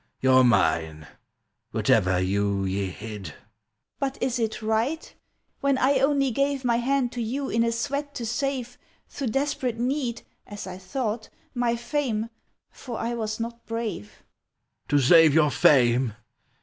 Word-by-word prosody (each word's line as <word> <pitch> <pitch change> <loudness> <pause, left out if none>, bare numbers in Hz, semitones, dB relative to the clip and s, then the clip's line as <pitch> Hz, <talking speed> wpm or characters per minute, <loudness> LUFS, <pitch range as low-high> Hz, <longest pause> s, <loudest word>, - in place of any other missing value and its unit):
You're 130 0 +5
mine, 80 -9 +2 0.6
whatever 90 0 +2
you 100 +1 0
ye 95 +1 -1
hid!" 105 -5 -8 0.6
"But 270 -1 -2
is 255 -1 -1
it 220 -1 -2
right! 225 +9 -1 0.5
When 275 -2 +2
I 270 +2 +3
only 275 -1 +2
gave 275 +2 0
My 235 -1 +3
hand 255 0 +1
to 245 - -4
you 265 +5 -3
in 230 +1 +2
a 230 - +1
sweat 285 +4 -3
to 235 - -4
save, 250 +1 -3 0.3
Through 275 - -4
desperate 260 -1 -1
need 250 0 -2 0.2
(As 205 -1 -7
I 185 -1 -7
thought), 220 +3 -3 0.2
my 240 -1 +1
fame, 235 -2 -2 0.4
for 240 -4 -7
I 235 +1 -2
was 220 -2 -3
not 235 +1 -5
brave!" 225 - -5 0.6
"To 145 - +2
save 155 +2 +6
your 150 -2 +4
fame? 125 -4 +4
230 Hz, 145 wpm, -25 LUFS, -, 0.6 s, save